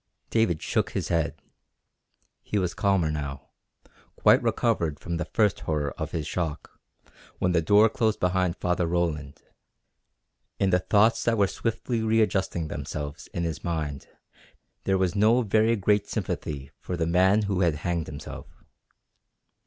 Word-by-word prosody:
David 110 -8 +1
shook - - 0
his - - -2
head. 85 -3 -1 1.0
He 105 - -3
was 90 -3 0
calmer 95 -6 +1
now, 70 -3 -5 0.7
quite - - +5
recovered 80 -3 0
from 85 -1 -4
the 90 - -2
first 105 -4 +1
horror 75 -2 -2
of - - -5
his 80 -2 -3
shock, 80 -4 -4 0.6
when 90 - +1
the 85 -2 +3
door 105 +7 +5
closed 110 -1 0
behind 90 -1 +1
Father 90 -1 0
Roland. 80 -5 -2 1.2
In 95 -1 +2
the 90 - +4
thoughts 105 +5 +3
that 115 -1 +2
were 100 - +4
swiftly 115 +3 -2
readjusting 105 -6 +1
themselves 75 +1 -6
in 85 - -4
his 80 -2 -3
mind 75 -5 -3 0.8
there 95 0 +2
was 95 -2 +1
no 110 +5 +4
very 110 +2 +3
great 105 0 +1
sympathy 70 -2 -4
for 90 - -5
the 80 - 0
man 95 +5 +3
who 100 -2 -1
had 85 -4 +2
hanged 85 +1 -2
himself. 75 0 -8
90 Hz, 145 wpm, -26 LUFS, 80-105 Hz, 1.2 s, quite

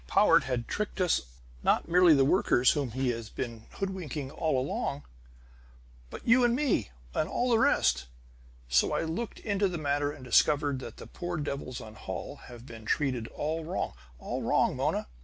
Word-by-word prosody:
"Powart - - +5
had 125 -3 -2
tricked 210 -1 -3
us; 180 -3 +3 0.4
not - - +2
merely 175 -1 +6
the 135 -1 +4
workers, 130 -6 +4
whom 140 -4 -1
he 130 0 0
has 115 -2 -3
been 115 -3 -6
hoodwinking 160 -8 -4
all 155 -3 0
along, 140 +1 -2 1.1
but - - -10
you 245 +2 +6
and 240 0 +3
me 270 - +1 0.2
and 155 - 0
all 245 +1 0
the 225 - +4
rest! 65 - +3 0.6
So - - +3
I - - 0
looked 200 +9 -4
into 200 -2 +1
the 180 -2 -3
matter 145 -1 0
and 135 -3 -11
discovered 145 +2 +3
that - - -9
the - - -9
poor 175 0 -5
devils 140 -4 -4
on 110 -1 -10
Holl 95 +6 -6
have 120 -1 -11
been 115 -4 -10
treated 125 -1 0
all 160 +5 -3
wrong. 175 +4 -3 0.2
All - - -4
wrong, - - +2
Mona! - - 0
145 Hz, 175 wpm, -29 LUFS, 125-180 Hz, 1.1 s, merely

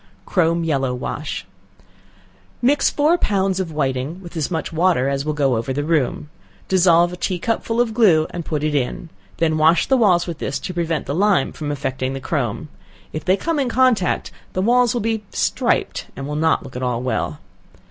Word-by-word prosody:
Chrome 170 -2 +1
Yellow 135 -5 0
wash. 145 +4 -5 1.1
Mix 280 +4 +3
four 310 +4 +2
pounds 195 -2 +1
of 180 -4 -3
whiting 140 +2 -2
with 175 -3 -11
as 155 -4 -1
much 160 -2 -3
water 165 -5 +2
as 140 0 -1
will 155 - -1
go 135 -4 +2
over 115 +4 -3
the 145 +2 -1
room; 150 -2 0 0.4
dissolve 175 -2 +4
a - - -4
tea 180 +1 -2
cupful 225 +4 -1
of 240 -2 +2
glue, 185 -9 +4
and 175 - -5
put 150 -2 -3
in; 150 +2 -1 0.3
then 160 -1 +1
wash 160 +2 +4
the 265 - +3
walls 185 -7 +4
with 170 -3 -6
this - - -2
to 185 - -6
prevent 165 -3 -1
the 140 - -3
lime 190 -3 +2
from 150 -2 -5
affecting 135 -2 -3
the 135 - -4
chrome; 135 -3 -2 0.5
if 155 - -4
they 185 +1 +2
come 330 +3 -1
in 265 -3 0
contact, 240 -6 +2 0.2
the 185 - 0
walls 245 +2 +3
will 240 - 0
be 220 0 -1
striped, - - 0
and 135 +1 -6
will 150 - -4
not 160 +1 +2
look 135 -3 -11
at 125 - -4
all 125 -1 -1
well. 130 - -2
165 Hz, 195 wpm, -20 LUFS, 145-195 Hz, 1.1 s, dissolve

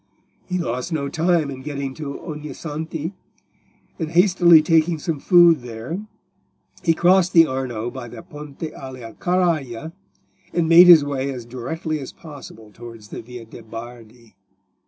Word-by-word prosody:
He 180 - -2
lost 125 -2 -3
no 140 -3 -2
time 160 -2 +1
in 130 -1 -8
getting 140 -1 -5
to 140 -1 -7
Ognissanti, 155 +1 -6 0.9
and 160 -2 -3
hastily 175 -2 +5
taking 165 +1 +2
some 155 0 -3
food 175 -1 +6
there, 120 - -6 0.8
he 165 -2 +3
crossed 180 +1 +3
the 165 -1 +7
Arno 125 -4 -4
by 120 - -8
the 120 - -10
Ponte 150 -4 -10
alia 130 -6 -8
Carraja, 160 -7 -1 0.6
and 170 -2 +1
made 170 +2 +8
his 165 -5 +8
way 140 -1 -2
as 125 -3 -7
directly 150 +6 -4
as 135 - -8
possible 135 -8 -12
towards 115 -1 -12
the - - -7
Via 120 0 -10
de' 110 - -12
Bardi. 115 0 -11
150 Hz, 145 wpm, -21 LUFS, 125-165 Hz, 0.9 s, made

